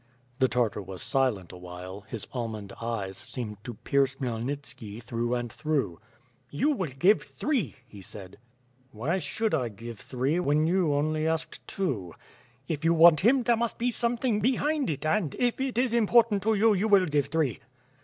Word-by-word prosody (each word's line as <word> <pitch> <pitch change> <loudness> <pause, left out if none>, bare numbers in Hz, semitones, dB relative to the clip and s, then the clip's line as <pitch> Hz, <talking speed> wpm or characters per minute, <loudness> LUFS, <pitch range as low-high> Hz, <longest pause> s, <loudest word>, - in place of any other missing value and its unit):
The 130 - +5
Tartar 115 -4 0
was 95 -1 -5
silent 130 - 0
awhile; 90 +2 -9
his 115 -4 -5
almond 110 -5 -4
eyes 105 -5 -3
seemed 115 -3 -6
to 120 -2 -6
pierce 135 +3 +1
Khmyelnitski 120 -3 -5
through 120 +1 -1
and 120 -2 -4
through: 145 - -1 0.5
"You 155 - +1
will 185 - -1
give 175 +11 +3
three," 265 - -2
he 105 -5 -12
said. 95 0 -10 0.5
"Why 140 - -1
should 220 +3 -1
I 125 -7 +1
give 115 +1 -9
three, 135 +6 -1
when 155 -2 +2
you 175 -2 +2
only 155 +2 0
asked 160 0 -3
two?" 115 - -2 0.5
"If 160 -2 -3
you 165 +1 +4
want 165 -1 +8
him, 250 +5 +4
there 235 0 +3
must 230 0 -1
be 245 +1 0
something 235 -1 0
behind 275 +6 +1
it 150 -1 -3
and, 155 -3 +1
if 245 +1 0
it 265 -3 -2
is 250 -1 +2
important 230 -2 +4
to 220 +3 +2
you, 215 +2 +4
you 200 +2 +1
will 200 -3 +5
give 145 -4 +1
three." 150 -4 0
145 Hz, 175 wpm, -28 LUFS, -, 0.5 s, want